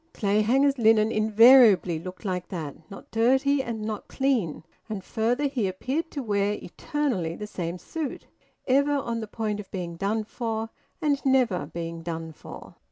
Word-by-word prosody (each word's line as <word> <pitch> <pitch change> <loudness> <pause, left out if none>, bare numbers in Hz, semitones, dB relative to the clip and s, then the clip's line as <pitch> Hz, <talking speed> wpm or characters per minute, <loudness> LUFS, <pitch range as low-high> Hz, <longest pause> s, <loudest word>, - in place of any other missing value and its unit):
Clayhanger's 235 +7 +2
linen 220 -1 +4
invariably 215 -5 +6
looked 185 +5 -9
like 180 -2 -2
that, 160 -6 -5
not 195 - -12
dirty 265 +5 +3
and 230 -4 -5
not 215 -1 -4
clean; 250 - 0 0.3
and 205 -3 -4
further, 240 +8 0
he 255 -7 0
appeared 265 - -3
to 280 - -5
wear 205 -2 +1
eternally 210 - -3
the 210 - -6
same 175 -4 -4
suit, 310 - -5 0.4
ever 280 +2 +3
on 235 -5 -1
the 220 - -5
point 210 -1 -3
of 205 - -8
being 175 -3 -5
done 210 +4 -1
for 225 0 -4 0.3
and 285 -2 +1
never 250 - +2
being 165 +1 -6
done 165 -1 -5
for. 155 - -11
220 Hz, 160 wpm, -26 LUFS, 185-260 Hz, 0.4 s, invariably